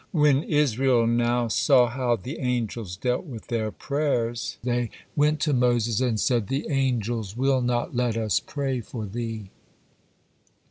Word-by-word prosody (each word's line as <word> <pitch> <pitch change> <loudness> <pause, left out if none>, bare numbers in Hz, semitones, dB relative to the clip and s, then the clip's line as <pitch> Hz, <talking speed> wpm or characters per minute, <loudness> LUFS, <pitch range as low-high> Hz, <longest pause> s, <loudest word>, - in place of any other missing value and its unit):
When 150 -4 +4
Israel 135 -5 +2
now 120 +1 +1
saw 125 +2 +4
how 120 0 0
the 125 - -7
angels 115 - -2
dealt 125 +4 -1
with 120 -8 -9
their 110 -2 -1
prayers, 120 -3 -2
they 120 -1 0 0.3
went 150 0 +2
to 150 - +2
Moses 120 -3 +2
and 120 -4 +1
said, 115 -4 +1
"The 135 +5 -2
angels 120 -6 -1
will 135 0 +2
not 120 0 -1
let 120 -2 0
us 110 -2 +1
pray 135 -3 -3
for 110 0 -6
thee." 110 -1 -5
120 Hz, 145 wpm, -25 LUFS, 115-135 Hz, 0.3 s, When